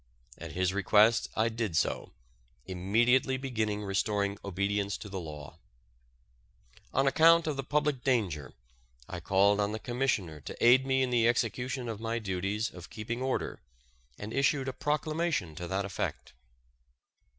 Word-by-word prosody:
At - - -7
his 90 +1 0
request 105 +3 +4
I 110 +1 +2
did 110 -7 -2
so, - - -1 0.5
immediately 120 +8 +2
beginning 110 -6 -2
restoring 100 0 -1
obedience 100 +1 -1
to 105 - -9
the 95 -1 -4
law. 75 -4 -9 1.3
On 135 - +2
account 165 +4 +5
of 155 -2 -1
the 135 - -3
public 145 -2 0
danger, 95 - 0 0.6
I - - -6
called 100 +2 +3
on 105 0 0
the 110 - -3
Commissioner 120 - -1
to - - -8
aid 130 +3 +5
me 130 0 +2
in 125 - -1
the 115 -2 +3
execution 125 +2 -1
of 110 -3 -4
my 115 +1 -2
duties 100 +1 -2
of 90 0 -11
keeping 115 +3 -5
order, 130 0 -2 0.6
and 105 +2 -7
issued 135 +1 +1
a 130 - -2
proclamation 150 - -1
to 85 +3 -6
that 95 +2 -1
effect. 95 -8 -4
110 Hz, 150 wpm, -30 LUFS, 100-130 Hz, 1.3 s, account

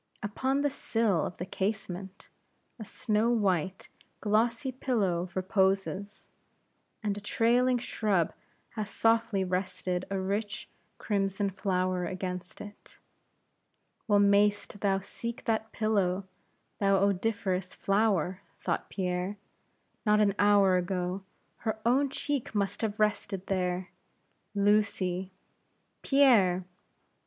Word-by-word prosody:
Upon 260 +7 0
the 290 -1 +1
sill 225 - 0
of - - -9
the 180 - -4
casement, 195 -1 -4 0.5
a - - -5
snow 215 +3 0
white 190 -6 0 0.3
glossy 230 +5 +1
pillow 200 -9 0
reposes, 195 +1 0 0.8
and 205 -2 0
a 205 - -7
trailing 245 +4 +3
shrub 210 -7 0 0.4
has 215 -2 -5
softly 225 -3 +2
rested 185 0 -2
a 195 - -1
rich, 200 +2 -2 0.3
crimson 195 -1 -1
flower 185 -1 0
against 180 -1 -5
it. 205 0 -12 1.1
Well 205 -2 +4
mayst 205 0 +3
thou 195 -1 +2
seek 235 +4 -6
that 220 -1 0
pillow, 200 -3 +1 0.5
thou 195 -1 +4
odoriferous 195 -1 0
flower, 195 -3 +1 0.2
thought - - -2
Pierre; 185 +1 -2 0.7
not 210 -1 +4
an 205 -2 +4
hour 200 -2 +5
ago, 180 +1 -2 0.4
her 220 -1 -2
own 270 +4 +3
cheek 280 -4 -3
must 200 -1 -1
have 215 -2 -2
rested 200 -2 0
there. 180 -1 -1 0.6
"Lucy!" 200 -3 +1 0.7
"Pierre!" 215 -11 +4
200 Hz, 110 wpm, -29 LUFS, 185-220 Hz, 1.1 s, hour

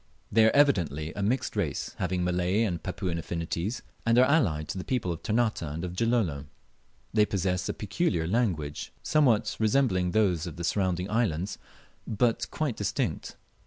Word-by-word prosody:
They 110 +1 +5
are 110 - +3
evidently 85 - +2
a 105 - -4
mixed 125 +6 0
race, 90 -9 -2
having 90 0 0
Malay 90 +4 +1
and 90 -7 -1
Papuan 85 -2 -3
affinities, 85 +7 -3 0.2
and 115 0 +3
are 125 - +7
allied 95 - +2
to 95 - -3
the - - -4
peoples 110 -9 -1
of 80 - -9
Ternate 110 +1 +1
and 80 +2 -4
of 90 0 -6
Gilolo. 100 - 0 0.7
They 105 -1 +5
possess 95 -2 -1
a - - 0
peculiar 100 - -1
language, 85 -8 -1
somewhat 115 -8 +3
resembling 110 -5 +2
those 90 -5 +1
of 85 - -7
the 85 - -6
surrounding 90 0 0
islands, 100 -5 -1 0.5
but 115 +1 +1
quite 150 -7 -2
distinct. 100 -2 -2
95 Hz, 160 wpm, -28 LUFS, 85-115 Hz, 0.7 s, are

